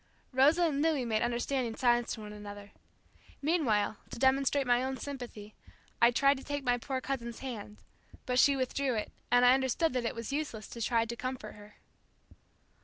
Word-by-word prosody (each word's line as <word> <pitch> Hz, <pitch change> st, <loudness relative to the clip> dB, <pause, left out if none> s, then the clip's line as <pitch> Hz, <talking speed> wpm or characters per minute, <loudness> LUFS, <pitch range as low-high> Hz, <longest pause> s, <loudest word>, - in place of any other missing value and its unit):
Rosa 290 Hz, +7 st, +5 dB
and 295 Hz, -4 st, +1 dB
Louis 305 Hz, -5 st, +1 dB
made 220 Hz, -2 st, 0 dB
understanding 240 Hz, 0 st, -1 dB
signs 240 Hz, -1 st, +2 dB
to 220 Hz, -, -7 dB
one 210 Hz, 0 st, -8 dB
another. 205 Hz, -1 st, -9 dB, 0.7 s
Meanwhile 245 Hz, -10 st, +1 dB
to -, -, -8 dB
demonstrate 270 Hz, +2 st, +2 dB
my 245 Hz, 0 st, +3 dB
own 265 Hz, 0 st, -2 dB
sympathy, 245 Hz, -7 st, -7 dB, 0.5 s
I 235 Hz, -, +8 dB
tried 275 Hz, +3 st, +3 dB
to 265 Hz, -, -10 dB
take 285 Hz, -1 st, -4 dB
my 245 Hz, -1 st, +1 dB
poor 265 Hz, +2 st, -3 dB
cousin's 235 Hz, -4 st, -4 dB
hand, 215 Hz, -5 st, -6 dB, 0.5 s
but 250 Hz, 0 st, +1 dB
she 280 Hz, +1 st, +6 dB
withdrew 260 Hz, 0 st, -1 dB
it, 215 Hz, -, -3 dB, 0.2 s
and 245 Hz, +1 st, +5 dB
I 250 Hz, -, +8 dB
understood 265 Hz, +4 st, +1 dB
that 250 Hz, -2 st, -1 dB
it -, -, -2 dB
was 230 Hz, +3 st, -5 dB
useless 280 Hz, -8 st, -3 dB
to 235 Hz, -, -8 dB
try 230 Hz, 0 st, +2 dB
to 235 Hz, +1 st, -5 dB
comfort 255 Hz, -3 st, -5 dB
her. 210 Hz, 0 st, -15 dB
250 Hz, 180 wpm, -31 LUFS, 230-275 Hz, 0.7 s, I